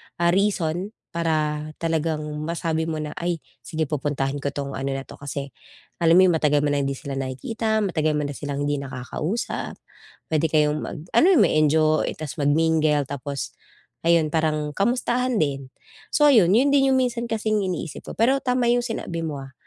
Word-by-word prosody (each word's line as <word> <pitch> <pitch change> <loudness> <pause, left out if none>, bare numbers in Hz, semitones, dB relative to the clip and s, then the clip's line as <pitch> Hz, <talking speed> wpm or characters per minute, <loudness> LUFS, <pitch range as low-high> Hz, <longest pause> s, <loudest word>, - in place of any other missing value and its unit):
ah, 170 0 +2
reason 190 0 0
para 155 -2 -1
talagang 160 -1 0 0.2
masabi 165 -1 -1
mo 155 -1 -2
na, 150 -1 -5
"Ay 170 -1 -2 0.2
sige, 160 -2 -2
pupuntahan 145 -1 -1
ko 140 - -3
'tong 140 -1 -4
ano 135 +1 -2
na 135 - -3
'to." - - -12
Kasi, 140 0 -5 0.5
alam 165 -1 +4
mo 185 - +8
'yung 170 - +3
matagal 150 -2 +2
mo 150 - +1
na 145 - +1
hindi 140 - -1
sila 135 0 -6
nakikita, 220 - -1
matagal 155 -6 0
mo 150 - 0
na - - -4
silang 145 -1 -4
hindi 145 0 0
nakakausap, 140 - -4 0.6
puwede 160 +1 +2
kayong 150 -1 +2
mag - - -6
ano - - +5
ma-enjoy, 155 - +3
tapos 155 0 -6
mag-mingle, 155 0 +2
tapos 140 0 -5 0.5
ayun 165 -2 +3
parang 155 -2 0
kamustahan 245 +5 0
din. 140 -6 -1 0.4
So, 295 - +3
ayun, 200 -5 +5
'yun 275 +4 +4
din 270 -1 +4
'yung 265 - +4
minsan 240 -2 -1
kasing 215 -1 0
iniisip 175 -4 -5
ko, - - -4
pero 260 +5 +3
tama 250 -2 +2
'yung 245 - +3
sinabi 180 -8 -4
mo, 150 -4 -4
ah, 135 - -13
160 Hz, 175 wpm, -24 LUFS, 145-195 Hz, 0.6 s, mo